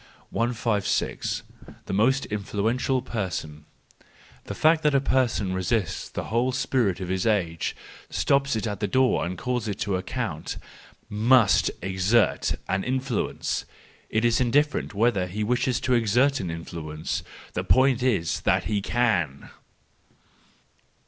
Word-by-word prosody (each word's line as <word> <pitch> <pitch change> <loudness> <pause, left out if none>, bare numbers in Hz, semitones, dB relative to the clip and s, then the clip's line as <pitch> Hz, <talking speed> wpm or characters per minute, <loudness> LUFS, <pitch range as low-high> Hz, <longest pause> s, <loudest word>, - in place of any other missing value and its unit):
156. 115 -3 -1 0.4
The - - -5
most 130 +7 +3
Influential 110 +5 -1
Person 85 -10 -4 0.8
.—The - - -5
fact 160 +1 +4
that 150 -2 +2
a - - +6
person 125 -8 +1
resists 95 +1 -1
the - - -4
whole 120 +3 0
spirit 125 -7 0
of 90 -2 -5
his 95 +2 0
age, 85 -7 0 0.3
stops 140 -2 +1
it 110 - -2
at 105 -2 -3
the 105 - 0
door, 130 +5 +2
and 90 +1 -5
calls 125 +1 -2
it 100 -2 -3
to 100 -3 0
account, 95 - -4 0.5
must 110 0 +4
exert 95 +4 +2
an 95 0 0
influence! 130 -2 -2 0.4
It 110 +2 +1
is 120 +1 +3
indifferent 140 -2 +1
whether 105 -4 +2
he 105 +4 -3
wishes 125 +2 +1
to 130 - +1
exert 120 +4 +3
an 90 - -3
influence; 80 -1 -4 0.3
the - - -2
point 130 -1 +4
is 105 -11 +1
that - - +2
he 105 -2 -1
can. 100 - 0
110 Hz, 135 wpm, -25 LUFS, 95-125 Hz, 0.8 s, a